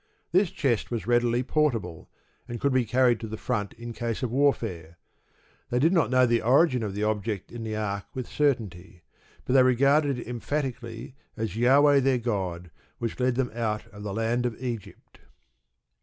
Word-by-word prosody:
This 185 +2 +3
chest 140 - -1
was 115 -2 -3
readily 120 +1 +2
portable, 120 - -1 0.4
and 120 0 -5
could 140 +2 +1
be 130 -2 +2
carried 125 0 +3
to 110 - -6
the 110 +1 -6
front 105 -6 -2
in 120 0 -8
case 115 +1 -3
of 120 - -1
warfare. 110 - 0 0.7
They 120 - 0
did 160 +8 +3
not 170 -4 +3
know 130 0 +4
the 120 -1 +2
origin 130 +1 +3
of 105 -3 -4
the 105 - -2
object 105 -2 -2
in 120 -1 -7
the 110 -1 -3
ark 100 -2 -3
with 130 -2 -4
certainty; 100 - -2 0.4
but - - -1
they 135 - +7
regarded 140 +2 +3
it 120 - -7
emphatically 125 -1 -4 0.2
as 110 -2 -2
"Jahweh 140 +6 +5
their 135 -1 +2
god, 95 -7 -3 0.3
which 115 +1 -4
led 125 -1 +1
them 125 -1 -1
out 110 -2 -2
of 105 - -10
the 105 -1 -4
land 115 +4 0
of 115 - -7
Egypt."... 120 -5 -7
120 Hz, 180 wpm, -26 LUFS, 110-130 Hz, 0.7 s, they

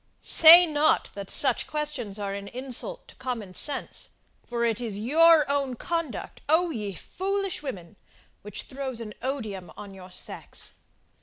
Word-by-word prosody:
Say 335 +2 +9
not 310 -1 +1
that 200 -1 -8
such 275 - +2
questions 290 -9 -3
are 200 -1 -4
an 200 0 -6
insult 265 - -3
to - - -16
common 230 -7 -5
sense 280 +7 +1 0.4
for 235 0 -1
it 230 0 0
is 220 -4 -3
your 315 +7 +5
own 280 -2 -1
conduct, 330 +1 -4
O 335 +2 +3
ye 210 -7 -4
foolish 390 - -3
women! 195 - -8 0.4
which 210 0 -7
throws 265 -3 -5
an 215 -2 -7
odium 215 -10 -4
on 200 -1 -9
your 185 -1 -12
sex! - - -5
255 Hz, 150 wpm, -26 LUFS, 205-305 Hz, 0.4 s, Say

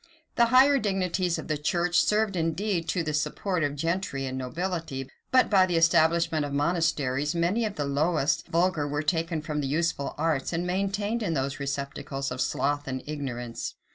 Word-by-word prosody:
The 235 - +5
higher 270 +3 +6
dignities 185 -4 0
of - - -7
the 155 -2 -1
church 175 +3 +1
served, 210 -2 +2
indeed, 170 +1 -1
to 180 - 0
the 155 -1 -2
support 175 +4 -1
of 145 0 -1
gentry 165 -3 -2
and 130 0 -4
nobility; 155 0 -3 0.2
but 255 -1 +5
by 190 -3 +4
the 175 - -1
establishment 165 -1 +3
of 145 - -4
monasteries, 150 -2 0
many 180 +7 +1
of 210 -2 -3
the 145 - -2
lowest 150 +2 +1
vulgar 170 -3 +1
were 145 +1 -2
taken 165 0 -1
from 150 -2 -2
the 140 - -2
useful 150 -1 -1
arts, 155 -1 0
and 170 +1 -1
maintained 200 +5 -1
in 170 -7 -1
those 135 0 -2
receptacles 140 -1 -4
of 125 +1 -3
sloth 145 +2 0
and 130 -1 -4
ignorance. 125 -6 -5
165 Hz, 175 wpm, -27 LUFS, 145-180 Hz, 0.2 s, higher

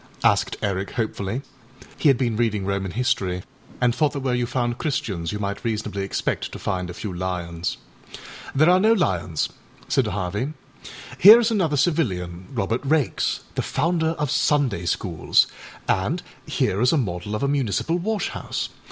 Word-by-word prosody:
â - - +8
asked - - -2
Eric 100 -1 -1
hopefully. 110 +2 -2 0.5
He - - +1
had 135 - +5
been 120 -3 0
reading 105 -4 0
Roman 100 -1 -1
history 95 -4 0 0.4
and 125 -1 +3
thought 150 +2 +1
that 140 - -3
where 130 -2 0
you 125 -1 0
found 120 -1 -1
Christians 115 - -2
you 105 - -3
might 100 -1 -3
reasonably 105 -3 -2
expect 95 - -2
to - - -5
find 90 -1 -2
a - - -5
few 100 0 -5
lions. 90 -2 -3 0.8
âThere 155 +3 +6
are 180 +1 +6
no 220 +3 +5
lions,â 90 - 0 0.4
said - - +2
Harvey. 105 - -2 0.7
âHere 215 +6 +11
is 230 -1 +1
another 170 -9 +1
civilian, 95 - 0
Robert 115 +5 -1
Raikes, 145 -1 +1
the - - -1
founder 165 +2 0
of 150 -2 -1
Sunday 135 - +1
schools, 85 -2 +2 0.4
and - - 0 0.2
here 100 - 0
is 125 - +4
a 160 - +3
model 105 -4 -2
of 105 - -2
a - - +2
municipal 140 - 0
wash 215 +3 -1
house. - - -4
115 Hz, 170 wpm, -23 LUFS, 95-145 Hz, 0.8 s, âHere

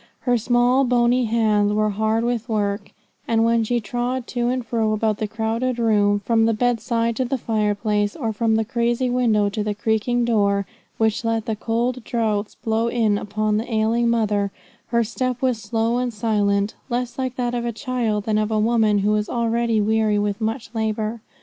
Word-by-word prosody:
Her 245 -1 +2
small 245 +3 +3
bony 245 0 +2
hands 215 -2 +2
were 215 0 +1
hard 220 +2 0
with 240 0 -2
work; 205 -1 -1 0.4
and 225 0 +2
when 230 0 +3
she 240 +2 0
trod 245 +3 -3
to 240 -1 -1
and 250 -1 -2
fro 225 -2 0
about 215 -1 0
the 215 - -1
crowded 225 +3 -2
room, 205 -3 +2
from 225 +1 +2
the 225 - +1
bedside 230 0 0
to 260 - 0
the 265 +2 -1
fireplace, 210 -2 0
or 225 -7 -2
from 220 +1 +1
the 220 0 +1
crazy 240 +1 0
window 225 -5 +2
to 210 +1 -3
the 210 -1 -2
creaking 225 +3 0
door, 200 -3 +2 0.3
which 220 +1 +1
let 225 -1 -1
the 220 - -2
cold 235 +3 -1
draughts 215 -3 -1
blow 225 0 -1
in 220 -4 +1
upon 210 +1 -1
the 230 +3 -4
ailing 225 +2 +2
mother, 210 -3 +1 0.4
her 235 -1 +2
step 250 +2 -2
was 250 -4 0
slow 225 +3 0
and 245 -2 -2
silent, 205 -1 +1 0.2
less 245 +1 -3
like 260 -1 -2
that 245 -1 -2
of 240 -1 -2
a 240 - -1
child 230 -3 -2
than 215 0 +1
of 215 0 0
a 220 - 0
woman 220 -1 +3
who 210 - +3
was 210 0 0
already 235 -1 0
weary 215 0 +2
with 205 +1 -1
much 220 0 -3
labour. 220 0 -2
225 Hz, 190 wpm, -22 LUFS, 215-240 Hz, 0.4 s, small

